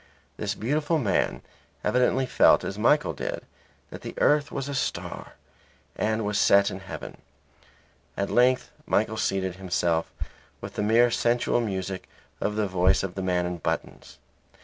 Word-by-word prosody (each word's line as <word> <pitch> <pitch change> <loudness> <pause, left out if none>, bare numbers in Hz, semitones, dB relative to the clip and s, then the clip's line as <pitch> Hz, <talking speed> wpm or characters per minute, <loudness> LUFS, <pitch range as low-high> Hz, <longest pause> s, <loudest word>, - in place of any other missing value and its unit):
This - - -2
beautiful 150 +7 0
man 115 -10 0 0.4
evidently 125 +1 +2
felt - - +4
as 95 - -4
Michael 150 +7 +3
did - - -5 0.5
that - - -8
the - - -7
earth 145 0 +3
was 135 - -4
a 140 - -4
star 130 - -4 0.6
and 110 0 0
was 105 0 0
set 100 0 +5
in 95 - -6
heaven. 95 0 -9 1.0
At 100 - -1
length 125 +1 +3 0.2
Michael 110 +1 +1
sated 95 -3 -1
himself 85 -3 0 0.5
with - - -8
the - - -3
mere 115 +3 +4
sensual 120 +1 +1
music 95 -3 -4 0.3
of 105 - -1
the 105 -1 +1
voice 90 0 +2
of 95 -2 -3
the 95 - -4
man 90 -1 0
in 90 -1 -4
buttons. - - -4
105 Hz, 150 wpm, -26 LUFS, 95-120 Hz, 1.0 s, set